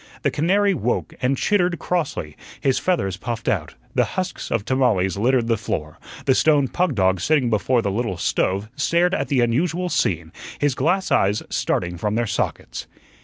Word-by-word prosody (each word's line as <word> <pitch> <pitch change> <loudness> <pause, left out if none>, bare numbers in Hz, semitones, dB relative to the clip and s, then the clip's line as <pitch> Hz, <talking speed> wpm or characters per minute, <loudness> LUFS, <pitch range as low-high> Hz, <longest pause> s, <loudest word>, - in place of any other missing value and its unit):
The - - +2
canary 195 +6 +2
woke 125 - -1
and 130 +2 +1
chittered 180 -2 +1
crossly, 150 - -2 0.2
his 135 -2 +1
feathers 95 - 0
puffed 115 +1 -5
out; - - -1 0.2
the - - +3
husks 185 -1 -3
of 105 -3 -1
tamales 110 -9 +2
littered 120 +3 +2
the 115 -2 +1
floor; 75 -7 -4 0.3
the 130 - +4
stone 145 -1 +3
pug 175 0 0
dog 95 -3 +2
sitting 135 -1 +2
before 115 +3 +2
the 100 - 0
little 105 -3 -2
stove 95 +6 0
stared 170 +5 +2
at - - 0
the 135 -4 +2
unusual 165 +9 0
scene, 85 - 0 0.3
his 145 -2 +1
glass 175 +9 0
eyes 100 +2 +2
starting 90 0 -1
from 105 +5 -1
their 120 +1 +1
sockets. 105 -1 -3
125 Hz, 170 wpm, -22 LUFS, 100-160 Hz, 0.3 s, the